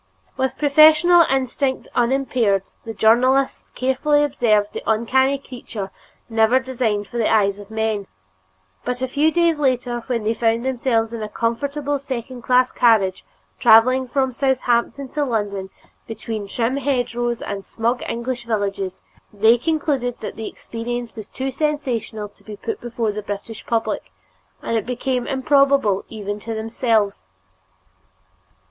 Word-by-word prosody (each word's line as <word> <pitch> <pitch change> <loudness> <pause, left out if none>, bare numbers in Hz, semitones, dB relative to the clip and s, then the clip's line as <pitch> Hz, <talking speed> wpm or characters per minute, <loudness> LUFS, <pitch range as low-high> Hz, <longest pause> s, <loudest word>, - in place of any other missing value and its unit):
With 265 0 -1
professional 310 +3 +6
instinct 265 0 -1
unimpaired, 240 -5 +1 0.2
the 225 - -5
journalists 255 +6 +3
carefully 270 +3 +2
observed 215 -7 +1
the - - -4
uncanny 260 +5 +2
creature 240 -7 -8 0.4
never 225 +2 +3
designed 235 -6 -1
for 240 - -7
the 225 - +2
eyes 200 -2 +2
of 205 0 -11
men; 220 -2 -2 0.8
but 250 +1 -3
a - - +1
few 290 +4 +2
days 335 -2 +2
later, 250 -3 0
when 240 -4 -1
they 220 +2 +1
found 230 +1 0
themselves 235 -3 0
in 230 - -5
a 215 - -4
comfortable 280 +6 -2
second 255 -2 -6
class 250 +1 +3
carriage, 210 - +3 0.4
traveling 250 +3 +5
from 265 +1 0
Southampton 260 +1 0
to 295 - -1
London 205 -6 -2 0.4
between 220 -2 -5
trim 235 +5 -1
hedgerows 240 -3 -1
and 200 -1 -5
smug 235 +4 -1
English 240 +1 -3
villages, 200 -4 -2 0.3
they 220 +3 +5
concluded 275 -3 -1
that - - -6
the 220 - -5
experience 240 +1 -6
was 215 -2 -8
too 265 +1 -4
sensational 255 -7 -2
to 205 - -25
be 215 - -8
put 430 - -5
before 235 -2 -2
the 210 +1 -5
British 205 +2 -6
public, 220 - -1 0.5
and 230 - -1
it 220 - 0
became 250 0 -2
improbable 275 -6 +3
even 205 -2 -5
to 225 +1 -5
themselves. 220 - 0
240 Hz, 140 wpm, -21 LUFS, 220-265 Hz, 0.8 s, professional